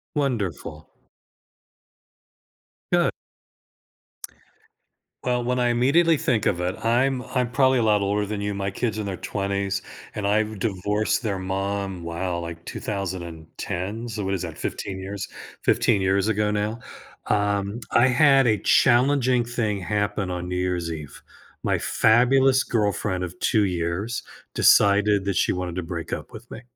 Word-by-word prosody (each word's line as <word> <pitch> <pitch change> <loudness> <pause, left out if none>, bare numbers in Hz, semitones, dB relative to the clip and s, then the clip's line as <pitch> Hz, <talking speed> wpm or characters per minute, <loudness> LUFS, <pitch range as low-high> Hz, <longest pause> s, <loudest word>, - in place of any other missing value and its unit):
Wonderful. 100 - -2 2.1
Good. - - +3 2.1
Well, 125 -1 0
when 125 +1 0
I 120 -1 +2
immediately 145 +8 +4
think 115 -6 0
of 90 - +1
it, 90 +1 -3
I'm 125 +3 +2
I'm 125 -2 -2
probably 130 0 +3
a - - +2
lot 105 -2 +3
older 100 +1 0
than 105 0 -4
you, 100 0 -2
my 100 0 -2
kid's 110 +2 -2
in 105 - -3
their 95 -3 -4
20s, 100 -1 -2 0.3
and 100 -1 -3
I've 105 0 +1
divorced 105 +3 0
their 100 -4 -2
mom, 95 -1 -3
wow, 85 +1 -3
like, 85 0 -7
2010? 95 +3 -5
So, 105 -3 -4
what 95 - -1
is 95 - -1
that, 80 -3 -6
15 95 -1 -4
years 100 +1 -5 0.3
15 100 - +3
years 95 +2 +1
ago 105 -1 +1
now? 105 +2 -1 0.5
Um, 100 +1 0
I 120 +2 +5
had 135 0 +5
a 110 -2 +4
challenging 130 -1 +3
thing 115 -4 -1
happen 105 0 -1
on 90 0 -4
New 90 - -2
Year's 90 -2 -1
Eve. 75 -4 -7 0.4
My - - +1
fabulous 130 +3 +4
girlfriend 100 -4 -1
of 90 0 -6
2 105 -2 +3
years 90 +6 -2 0.3
decided 100 -1 +4
that 100 -3 -1
she - - +2
wanted 90 -2 -3
to 90 - -2
break 85 -1 -4
up - - -8
with 115 +2 -11
me. 120 - -8
100 Hz, 150 wpm, -24 LUFS, 95-120 Hz, 2.1 s, I